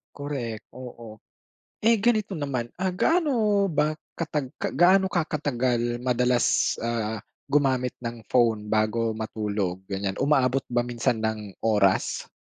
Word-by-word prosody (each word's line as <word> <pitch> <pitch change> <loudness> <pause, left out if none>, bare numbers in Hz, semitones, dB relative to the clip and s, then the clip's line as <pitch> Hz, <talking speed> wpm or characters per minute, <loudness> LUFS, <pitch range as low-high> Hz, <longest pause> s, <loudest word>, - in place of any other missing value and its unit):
Correct, 130 -6 -4
oo. 120 -4 -10 0.6
Eh 230 +1 +4
ganito 215 -4 +1
naman, 130 -5 -3
ah, 185 -1 -1
gaano 225 - +2
ba 150 -1 +2 0.3
katag 150 -5 -2
gaano 190 +2 +3
ka 170 -4 0
katagal 125 -5 -1
madalas, 125 0 +2
ah, 110 -2 -2 0.3
gumamit 130 -3 +2
ng 115 -1 -5
phone 115 -4 +2
bago 110 +1 +1
matulog 105 -4 -2
ganyan, 95 0 -2
umaabot 135 -2 +2
ba 120 0 +2
minsan 120 -1 0
ng 110 -3 -3
oras? 105 -4 +2
125 Hz, 120 wpm, -26 LUFS, 110-150 Hz, 0.6 s, Eh